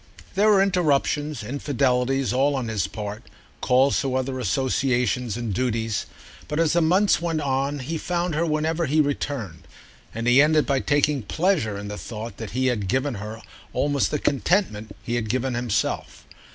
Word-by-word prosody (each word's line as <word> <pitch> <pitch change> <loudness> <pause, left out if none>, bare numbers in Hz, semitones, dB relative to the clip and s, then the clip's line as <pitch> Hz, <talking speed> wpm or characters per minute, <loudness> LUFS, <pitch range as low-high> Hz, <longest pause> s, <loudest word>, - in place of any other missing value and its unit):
There 205 +3 +4
were 195 -2 +6
interruptions, 150 - +1
infidelities, 135 0 0
all 140 +3 +2
on 125 -4 -2
his 110 -3 -1
part, 105 0 -6 0.4
calls 130 +2 +3
to 135 -3 -1
other 130 0 -2
associations 125 -1 0
and 115 -4 -3
duties; 115 -2 -1 0.4
but 150 - -2
as 165 -2 +3
the 170 - +3
months 185 +4 +3
went 165 -2 -1
on 140 +1 0
he 155 +4 -4
found 175 0 -1
her 155 +3 +1
whenever 160 +1 0
he 150 +3 +2
returned, 125 - -2 0.4
and 115 +1 -4
he 120 +3 +6
ended 155 0 +4
by 140 -1 +1
taking 145 0 +1
pleasure 150 - 0
in 100 0 -6
the 105 0 -6
thought 115 0 -7
that 110 -3 -6
he 130 - +1
had 115 -6 0
given 130 +7 0
her 110 +1 -7 0.3
almost 145 -1 +1
the 150 - 0
contentment 140 - 0
he 120 - -4
had 115 -3 -1
given 130 +2 0
himself. 120 -3 -2
135 Hz, 170 wpm, -24 LUFS, 115-150 Hz, 0.4 s, were